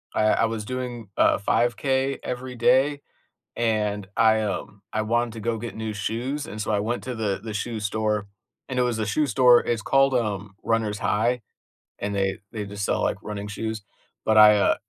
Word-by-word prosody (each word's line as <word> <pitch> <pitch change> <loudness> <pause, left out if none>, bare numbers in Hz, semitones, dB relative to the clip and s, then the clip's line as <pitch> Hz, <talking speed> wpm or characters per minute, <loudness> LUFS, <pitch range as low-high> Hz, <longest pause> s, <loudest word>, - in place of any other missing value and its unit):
I 110 - +2
I 115 - +3
was 110 -1 -3
doing 125 -4 -5
a - - +4
5K 130 +5 +1
every 125 0 -5
day, 140 +4 +3 0.5
and 105 -3 0
I, 110 -1 +5
um, 100 -1 -4
I 110 - +1
wanted 120 +1 0
to 115 - -7
go 115 +1 -1
get 120 +1 -6
new 110 -1 -4
shoes, 120 +8 -3
and 105 +1 -6
so 110 - -3
I 105 - +2
went 120 +3 -2
to 125 -2 -4
the 100 -3 -1
the 110 -2 -5
shoe 110 +1 -3
store, 105 0 -1 0.4
and 130 - -3
it - - +4
was 120 -2 -1
a 110 - 0
shoe 150 +9 +1
store, 125 -3 +6
it's 115 -2 0
called, 135 0 +3
um, 100 -4 -2
Runner's 110 -2 0
High, 120 +4 +1 0.6
and 100 0 -3
they 95 0 0
they 105 -2 -4
just 100 0 -4
sell, - - 0
like, - - 0
running 105 -1 -5
shoes, 110 0 -4 0.4
but 110 0 +3
I, 105 -1 +9
uh, 100 - +3
110 Hz, 200 wpm, -25 LUFS, 105-120 Hz, 0.6 s, I